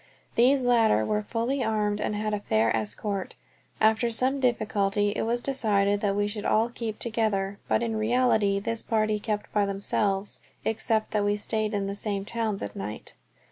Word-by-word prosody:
These 260 +3 +4
latter 225 - +3
were 210 - 0
fully 235 +5 -1
armed 210 -2 0
and 210 - -1
had 215 0 -2
a 210 - 0
fair 110 - +1
escort. 125 - -3 0.4
After 220 +2 +3
some 255 +4 +1
difficulty 210 -5 +1
it - - -1
was 240 +1 0
decided 205 -7 +1
that 200 -2 +1
we 205 0 +1
should 210 0 -5
all 225 +2 +2
keep 230 -3 -5
together, 210 -4 -1
but 225 - +1
in 225 -1 -1
reality 220 -3 +2
this 230 +3 -2
party 215 -2 0
kept 210 0 -4
by 205 -1 +2
themselves, 200 0 -1 0.3
except 220 0 0
that 210 -1 +1
we 205 0 +2
stayed 215 +1 -1
in 200 -1 -1
the 195 - -3
same 200 -1 0
towns 220 -2 -2
at 100 - -6
night. 105 +2 -6
215 Hz, 180 wpm, -27 LUFS, 200-230 Hz, 0.4 s, These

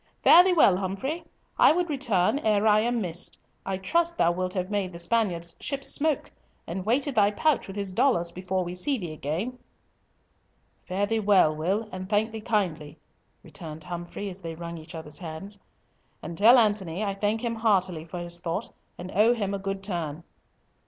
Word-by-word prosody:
"Fare 350 - +9
thee 375 - +2
well, 200 - +5
Humfrey. 200 - -3 0.4
I - - +8
would 350 +2 +1
return 260 - +1
ere 215 -4 +2
I 215 -1 +5
am 235 +1 0
missed. 175 -2 -3 0.3
I 195 -1 -1
trust 335 - 0
thou 170 - +4
wilt 185 +1 -2
have 185 +1 -2
made 195 -3 -1
the - - -7
Spaniard's 170 -3 0
ships 275 -1 -1
smoke, 305 -1 +1 0.3
and 185 +2 -4
weighted 270 +5 +1
thy 205 -3 +4
pouch 285 +7 +1
with 195 - -8
his 200 -2 -3
dollars, 180 -5 +2
before 185 +1 -2
we 175 0 -5
see 265 +10 0
thee 175 -7 -6
again." 175 - -4 1.3
"Fare 195 +2 0
thee 225 +2 0
well, 195 -7 +4
Will, 190 +8 -1
and 185 +1 -7
thank 215 +2 +1
thee 220 -1 -6
kindly," 180 -10 -2 0.5
returned 155 -1 -8
Humfrey, 175 +3 -6
as 185 +1 -10
they 165 -2 -6
wrung 170 0 -7
each 160 +2 -11
other's 155 -2 -8
hands. 180 +5 -7 0.6
"And 170 +2 -6
tell 225 +8 +7
Antony 205 -6 +1
that 215 - -1
I - - -2
thank 210 +3 -1
him 235 -1 -1
heartily 190 -7 +1
for 170 +2 -8
his 175 0 -5
thought, 170 -1 -3 0.3
and 180 +1 -7
owe 220 +5 +4
him 200 -3 -2
a 200 - -2
good 195 0 -4
turn." 170 -5 -4
195 Hz, 190 wpm, -26 LUFS, 175-220 Hz, 1.3 s, Fare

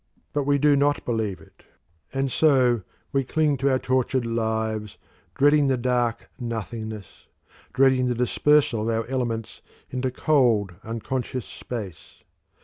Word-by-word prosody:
But 145 -2 0
we 145 0 +4
do 145 +1 +4
not 145 +1 +1
believe 110 -5 -1
it, - - -20 0.5
and 135 0 -1
so 130 -7 +3 0.3
we 135 0 +1
cling 150 +2 +1
to 135 +2 +1
our 130 - +3
tortured 130 -1 0
lives, 110 -2 -2 0.4
dreading 145 +1 +4
the 130 -1 +2
dark 120 -2 0
nothingness, 110 -3 -6 0.4
dreading 130 -1 +3
the 125 - 0
dispersal 125 0 +2
of 110 - -1
our 115 0 0
elements 120 -3 -3 0.3
into 130 0 -1
cold, 125 - +2
unconscious 125 +2 -4
space. 105 -9 -8
125 Hz, 135 wpm, -24 LUFS, 115-135 Hz, 0.5 s, we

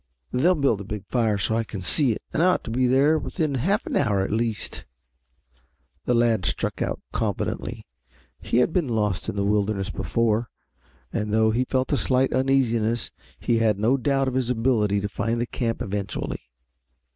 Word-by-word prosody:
They'll 165 +9 +3
build 135 - +1
a - - -5
big 105 -1 -6
fire 115 -4 +1
so 105 +3 0
I 115 - +1
can 105 -2 -7
see 125 - +2
it 110 - -4
and - - +1
I 180 - +5
ought 185 - +2
to 115 - -6
be 125 +2 +2
there 140 +5 +4
within 155 -4 -2
half 190 - 0
an - - -3
hour 100 -2 +2
at 95 - -2
least." 110 0 -2 1.2
The 125 - +2
lad 115 -4 +2
struck - - -2
out - - -1
confidently. - - -3 0.6
He - - 0
had 125 +6 +3
been 175 -6 +1
lost 105 -5 -1
in - - -4
the 100 - 0
wilderness 100 -1 0
before, 115 0 0 0.6
and 105 -2 -2
though 110 0 +3
he 125 +3 +1
felt 130 0 0
a - - +3
slight 130 0 +1
uneasiness 120 -4 +1 0.3
he 115 -1 +1
had 110 -3 +2
no 110 +6 +3
doubt 135 +1 +1
of 130 - -1
his 130 -2 0
ability 110 -4 +1
to 100 - -1
find 115 +3 -2
the 120 - 0
camp 115 -1 -2
eventually. 100 +1 -4
115 Hz, 190 wpm, -24 LUFS, 105-130 Hz, 1.2 s, I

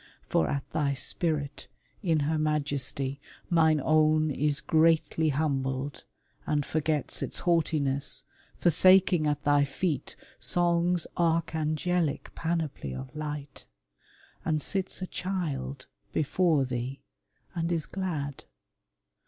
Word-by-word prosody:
For 80 - +1
at 140 - -2
thy 145 -3 0
spirit 145 0 -2 0.3
in 165 -7 +2
her 155 +2 0
majesty 140 -2 -1 0.3
Mine 160 -2 +4
own 155 +1 +3
is 145 +1 0
greatly 160 -1 +3
humbled, 135 -2 -1 0.4
and 145 -2 +1
forgets 155 -2 -1
Its - - -2
haughtiness, 150 -5 +1 0.3
forsaking 180 -1 +5
at 145 -1 -1
thy 145 0 +4
feet 140 +1 -2 0.2
Song's 175 0 +2
archangelic 165 -1 0
panoply 160 - -2
of 65 +1 -8
light, 150 -2 -6 0.8
And 155 -1 +1
sits 190 +3 -2
a - - -1
child 150 -9 -3 0.3
before 155 -1 +2
thee, 125 +2 -4 0.5
and 170 -1 -1
is 165 -3 0
glad. 155 -8 -4
155 Hz, 105 wpm, -28 LUFS, 140-165 Hz, 0.8 s, forsaking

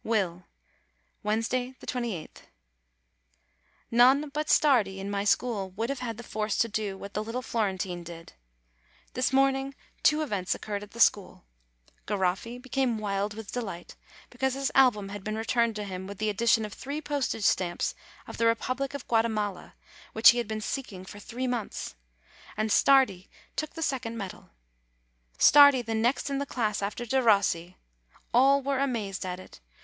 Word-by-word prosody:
WILL 185 -6 -1 0.7
Wednesday, 230 +4 -1
28th. 235 -10 -5 1.4
None 260 +5 +5
but 300 +1 -2
Stardi 235 -10 +3
in 195 +1 -5
my 200 0 -1
school 210 -2 +1
would 225 +4 -2
have 275 -2 -3
had 230 -3 -4
the 240 - -8
force 215 -2 -2
to 230 - +3
do 210 -3 -3
what 200 +1 -9
the 210 - -2
little 235 +3 -4
Florentine 190 -6 -2
did. 165 -1 -11 0.8
This 255 0 0
morning 270 0 +2 0.3
two 310 0 +3
events 205 -10 -1
occurred 205 -1 -5
at 210 - -10
the 230 - -10
school: 200 - +2 0.6
Garoffi 200 +4 -1
became 260 -2 -1
wild 205 0 -2
with 220 -2 -8
delight, 195 -8 -6 0.4
because 265 +1 -1
his 275 -1 -1
album 235 -7 +4
had 205 -1 -7
been 215 +1 -3
returned 230 0 +1
to 210 - -4
him, 190 -1 -6
with 200 0 -8
the 215 +1 0
addition 225 +1 +2
of 210 - -8
three 285 +3 -5
postage 285 -7 -2
stamps 175 -3 +1 0.3
of - - -9
the 230 - +3
Republic 255 +4 -1
of 280 - -7
Guatemala, 220 -4 -1 0.4
which 220 +1 +8
he 240 - -2
had 235 - -2
been 215 0 -4
seeking 210 -7 -5
for 205 - -10
three 245 +5 -5
months; 240 - -3 0.6
and 215 0 0
Stardi 260 -10 +4 0.3
took 310 +1 -4
the 325 - -3
second 250 -5 -2
medal. 195 -4 -7 0.9
Stardi 285 -3 +7
the 225 0 -4
next 235 +6 +1
in 275 - -1
the 280 - -3
class 215 -6 -1
after 210 +4 -3
Derossi! 200 -8 +2 0.6
All 270 +3 +5
were 275 -1 0
amazed 215 -9 -2
at 180 0 -4
it. 185 - -13
225 Hz, 165 wpm, -28 LUFS, 200-255 Hz, 1.4 s, which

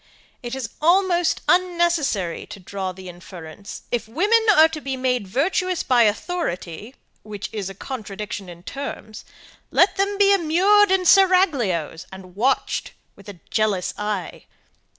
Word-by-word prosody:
It 240 +1 -5
is 260 -4 -5
almost 350 +1 +2
unnecessary 345 - +1
to - - -10
draw 190 0 -5
the 185 0 -11
inference. 175 +1 -10
If 240 -2 -2
women 410 - +2
are 315 -1 +7
to 320 -1 -7
be 270 -1 -4
made 250 -5 -1
virtuous 355 - 0
by 250 -2 +3
authority, 210 - -3 0.3
which 205 -2 -7
is 200 -3 -4
a 195 - -10
contradiction 205 -4 -7
in 175 0 -12
terms, 270 -3 -7 0.5
let - - +3
them 400 +1 0
be 400 0 +5
immured 390 +4 +4
in 380 -1 +2
seraglios 300 - +3
and 185 -1 -12
watched 255 +6 -1 0.2
with 200 0 -14
a 180 -5 -12
jealous 210 -4 0
eye. 210 -4 -4
245 Hz, 140 wpm, -22 LUFS, -, 0.5 s, are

